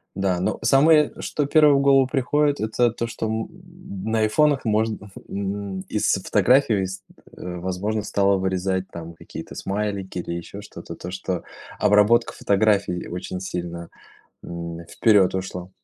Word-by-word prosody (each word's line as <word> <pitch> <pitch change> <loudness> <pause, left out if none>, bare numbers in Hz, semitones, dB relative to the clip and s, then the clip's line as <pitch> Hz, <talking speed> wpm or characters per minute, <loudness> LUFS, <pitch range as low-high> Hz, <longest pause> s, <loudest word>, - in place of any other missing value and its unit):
Да, 95 -2 0
но 90 - -1
самое, 150 +2 +5
что 145 - -2
первое 150 0 +5
в 140 - +3
голову 135 -2 +5
приходит- 145 +2 +1
это 110 +2 +2
то, 115 +1 -3
что, 115 - -4
м, 110 +1 -2 0.6
на 110 0 0
айфонах 140 +6 +2
можно, 110 -1 0 0.2
м, 100 -1 -4
из - - +1
фотографий 120 -6 +3
ст 95 +1 -7 0.3
э, 90 -1 -6
возможно 95 +5 -2
стало 100 -1 +2
вырезать 95 0 -1
там 85 0 -8
какие-то 80 - -10
смайлики 100 -2 -3
или 85 - -4
еще 85 +4 -7
что-то, 105 - -10
то 90 - -7
что 95 -1 -3 0.4
обработка 105 +3 +4
фотографий 100 -2 +2
и - - -8
очень 90 +1 -5
сильно, 85 -2 -5 0.6
м, 85 -1 -6
вперед 100 -3 +3
ушла. 95 -1 -5
100 Hz, 150 wpm, -23 LUFS, 95-115 Hz, 0.6 s, самое